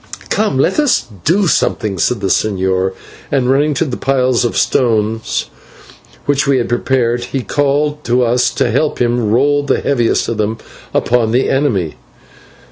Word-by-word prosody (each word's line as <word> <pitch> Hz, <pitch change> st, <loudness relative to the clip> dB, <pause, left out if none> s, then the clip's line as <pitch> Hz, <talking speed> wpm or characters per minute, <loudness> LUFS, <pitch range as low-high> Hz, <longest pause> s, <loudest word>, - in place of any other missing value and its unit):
"Come, 210 Hz, -10 st, +1 dB
let 175 Hz, -, +1 dB
us 295 Hz, -4 st, +2 dB, 0.2 s
do 190 Hz, +6 st, +3 dB
something," 105 Hz, -, 0 dB
said 120 Hz, +4 st, 0 dB
the -, -, -2 dB
señor, 95 Hz, -2 st, 0 dB, 0.4 s
and, 130 Hz, -2 st, +1 dB
running 145 Hz, +2 st, +2 dB
to 165 Hz, -, 0 dB
the 130 Hz, -5 st, -4 dB
piles 130 Hz, -2 st, +1 dB
of 120 Hz, -, -1 dB
stones 110 Hz, -2 st, 0 dB, 0.8 s
which 140 Hz, 0 st, +1 dB
we 140 Hz, -1 st, +3 dB
had 120 Hz, -, -1 dB
prepared, 120 Hz, -1 st, 0 dB
he 130 Hz, 0 st, -4 dB
called 145 Hz, +2 st, 0 dB
to 125 Hz, +1 st, +2 dB
us 120 Hz, +1 st, +2 dB
to 120 Hz, -, +1 dB
help 145 Hz, +5 st, 0 dB
him 120 Hz, -2 st, +1 dB
roll 145 Hz, +6 st, +2 dB
the 145 Hz, -, 0 dB
heaviest 120 Hz, -5 st, 0 dB
of 115 Hz, -, -3 dB
them 110 Hz, +1 st, -1 dB, 0.3 s
upon 120 Hz, -2 st, +1 dB
the 130 Hz, +2 st, +2 dB
enemy. 115 Hz, -, 0 dB
125 Hz, 160 wpm, -15 LUFS, 115-140 Hz, 0.8 s, do